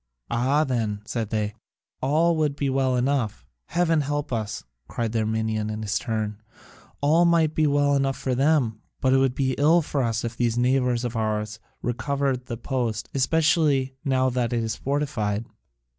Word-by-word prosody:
"Ah, 135 +6 +2
then," 110 -7 -2
said 115 -2 -3
they, 105 -1 -1 0.5
"all 160 +5 +3
would 150 -3 0
be 140 -2 -1
well 130 -1 +1
enough." 125 -3 0 0.2
"Heaven 165 -3 +2
help 145 -1 -2
us!" 110 -2 -3 0.2
cried 115 -2 -2
the 115 - 0
Armenian 110 0 -1
in 110 0 -4
his 100 -2 0
turn, 110 -3 -3 0.6
"all 155 +4 +4
might 165 -2 +3
be 155 -1 +2
well 145 0 +3
enough 135 -1 +1
for 130 -1 -2
them, 130 -5 +2 0.2
but 130 0 +2
it - - +5
would 135 -1 +2
be 130 -1 +1
ill 160 +4 +5
for 145 -1 -1
us 115 -2 -1
if 115 0 -4
these 120 -1 0
neighbours 125 -1 +2
of 120 0 -3
ours 110 -1 -2 0.2
recovered 135 +1 -1
the 120 - -4
post, 120 -3 -2
especially 140 -1 +2
now 130 -1 +2
that 125 -1 -1
it 115 -1 0
is 110 - -2
fortified." 120 -7 -1
130 Hz, 175 wpm, -25 LUFS, 110-145 Hz, 0.6 s, it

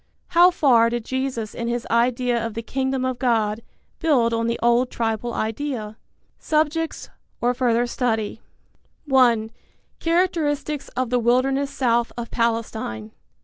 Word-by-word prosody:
How 350 +1 +6
far 245 -9 +4
did 235 -1 -3
Jesus 260 -4 -3
in 235 - -4
his 240 0 -2
idea 240 0 +1
of 230 -2 -4
the 230 - -4
Kingdom 265 +1 -1
of 255 -1 -2
God 225 -3 +1 0.4
build 255 -8 +2
on 230 0 0
the 235 - -1
old 240 +1 +3
tribal 225 +1 -2
idea? 220 -1 -3 0.4
Subjects/or 310 -5 -2
Further 240 -1 +1
Study. 225 -3 -2 0.6
(1) 240 -5 +3 0.5
Characteristics 315 -4 0
of 255 -2 -1
the 250 - +3
Wilderness 265 +4 +2
South 240 -4 +1
of 235 -1 -6
Palestine. 220 - -2
240 Hz, 130 wpm, -23 LUFS, 230-270 Hz, 0.6 s, How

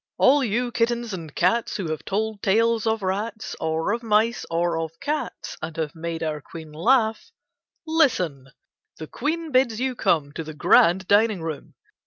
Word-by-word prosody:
All 280 +1 +5
you 240 +2 -1
kittens 235 -2 0
and 165 -5 -7
cats 205 +7 +1
who 175 -6 -3
have 155 - -4
told 215 +1 -2
tales 225 +2 +2
of 220 -2 0
rats, 210 +4 -3
or 160 +3 0
of 235 - -2
mice, 225 +1 +1
or 170 0 0
of 165 0 -5
cats, 300 +2 -4
and 155 +1 -6
have 155 -2 -2
made 165 0 -5
our 155 -2 -3
Queen 160 +1 -10
laugh, 220 - +1 0.6
listen! 185 - +1 0.5
The 160 - -6
Queen 320 - -3
bids 255 -4 +2
you 260 0 -1
come 160 -10 +1
to 165 - -5
the 155 -1 -9
grand 175 +4 +4
dining 205 -3 +3
room. 155 -3 -6
205 Hz, 170 wpm, -24 LUFS, 165-235 Hz, 0.6 s, All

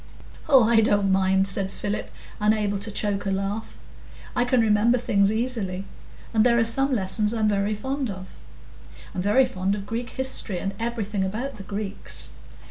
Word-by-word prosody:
"Oh, 265 -4 +7
I 225 0 +4
don't 205 -2 +2
mind," 190 0 +3
said 195 -1 +2
Philip, 205 +1 -4 0.3
unable 210 -1 +1
to 200 - -6
choke 205 -1 -2
a - - +1
laugh; 195 +3 -3 0.6
"I 245 -1 +2
can 245 0 +2
remember 225 +2 +3
things 200 -4 +2
easily. 220 -5 -2 0.5
And 220 -1 +4
there 235 0 +4
are 230 - +4
some 270 +5 +3
lessons 210 0 0
I'm 220 -1 +1
very 205 0 +1
fond 265 +4 -3
of. 190 -1 -8 0.8
I'm 180 - -2
very 210 +7 +4
fond 195 -5 -1
of 200 -1 -6
Greek 235 +3 -4
history, 260 -7 -1
and 195 +2 -3
everything 220 -4 -2
about 220 +8 -4
the 195 - -8
Greeks. 200 0 -6
210 Hz, 170 wpm, -24 LUFS, 195-235 Hz, 0.8 s, Oh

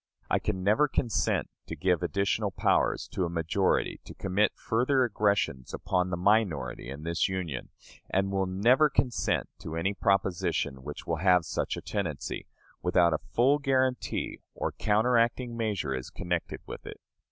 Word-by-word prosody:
I - - +4
can 95 -3 -2
never 110 +10 +4
consent 120 -5 0 0.2
to - - -5
give 90 -2 +1
additional 100 +4 0
power - - +2
to 95 - -1
a - - -3
majority 85 +3 0
to - - -10
commit 95 +3 +1
further 130 +4 +2
aggressions 100 - 0
upon 90 0 0
the 90 - -2
minority 95 - +1
in 70 +3 -7
this 85 +3 0
Union; 85 -9 -4 0.4
and 95 +1 +1
will 95 -1 0
never 120 +11 +4
consent 130 -3 0
to 80 - -6
any 95 +5 0
proposition 95 -8 0
which 75 +2 -7
will 80 - -1
have 90 0 +4
such 85 -4 -2
a - - -5
tendency, 85 -9 -3 0.3
without 90 -2 +3
a 80 - 0
full 135 +5 +2
guarantee 130 -3 0 0.2
or - - -2
counteracting 115 +2 +2
measure 105 - -1
is 65 -1 -5
connected 85 -1 -3
with - - -8
it. - - -8
95 Hz, 155 wpm, -29 LUFS, 85-110 Hz, 0.4 s, I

